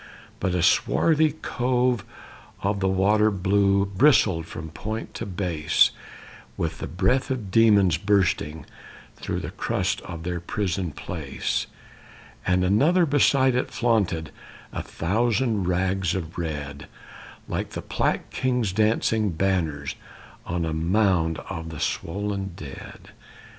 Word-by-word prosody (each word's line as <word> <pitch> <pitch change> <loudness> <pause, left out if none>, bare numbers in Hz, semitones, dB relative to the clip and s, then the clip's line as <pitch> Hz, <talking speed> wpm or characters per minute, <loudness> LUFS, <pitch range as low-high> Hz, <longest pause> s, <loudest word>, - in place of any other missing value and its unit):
But 90 -1 0
a 90 - +1
swarthy 155 - +3
cove 125 -1 +1 0.6
by 100 - +2
the 100 -1 -1
water 105 +3 +3
Blue 100 0 +2
bristled 100 - +3
from 80 -1 -7
point 110 +8 -5
to - - -5
base, 85 -5 +2 0.7
With 80 -1 -2
the - - -4
breath 100 +10 +1
of 120 -8 -3
demons, 100 -6 +5
bursting 90 -5 +1 0.5
Through - - -3
the - - -5
crust - - -1
of 85 -2 -8
their 90 0 -2
prison 90 0 -2
place; 75 -1 -3 0.8
And 90 0 +3
another 150 - +4
beside 140 -3 +3
it 125 - 0
flaunted 100 -10 0 0.4
A - - -3
thousand 110 +3 0
rags 90 0 0
of 85 -4 -5
red, 75 -4 -5 0.6
Like - - -3
the - - -5
Plague - - -1
King's 125 -7 0
dancing 110 0 +2
banners 80 -5 -1 0.5
On 85 0 -1
a 80 - -2
mound 85 -1 +2
of 80 0 -5
the 80 -2 -7
swollen 100 +1 -2
dead. 70 -5 -10
95 Hz, 125 wpm, -25 LUFS, 85-110 Hz, 0.8 s, demons